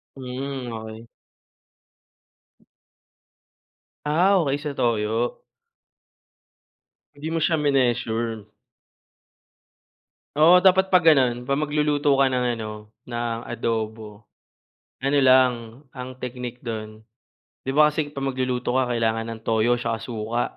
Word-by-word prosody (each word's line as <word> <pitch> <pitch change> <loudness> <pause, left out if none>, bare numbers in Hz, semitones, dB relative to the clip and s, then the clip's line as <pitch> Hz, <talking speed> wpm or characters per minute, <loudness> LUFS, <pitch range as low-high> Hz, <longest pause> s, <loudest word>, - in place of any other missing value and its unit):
Hmm, 130 -1 -5
okey. 110 +1 -8 3.0
Ah, 180 +6 +3
okey 140 -2 0
sa 150 -2 -4
toyo. 115 0 -1 1.7
Hindi 150 +2 -7
mo 165 - 0
siya 160 0 +2
mineasure. 115 -6 0 1.9
Oo 180 +4 +7
dapat 190 0 +5
'pag 185 -3 +4
ganun, 130 -6 +4
'pag 140 +3 -1
magluluto 150 -1 +1
ka 135 -1 +3
ng 125 -1 0
ano 105 -1 -7 0.2
ng 120 -1 -3
adobo. 110 -2 -4 0.8
Ano 140 +2 0
lang, 130 -2 +5 0.4
ang 130 0 -6
teknik 125 -1 -6
dun, 110 -2 -6 0.6
'di 135 - -3
ba 150 +2 +5
kasi 150 -2 -2
'pag 135 -2 -4
magluluto 130 -1 -2
ka 130 -1 +1
kailangan 115 -1 -1
ng 110 -1 -7
toyo 115 +2 +2
'tsaka 115 -2 -3
suka, 115 0 -3
125 Hz, 110 wpm, -23 LUFS, 115-140 Hz, 3.0 s, Oo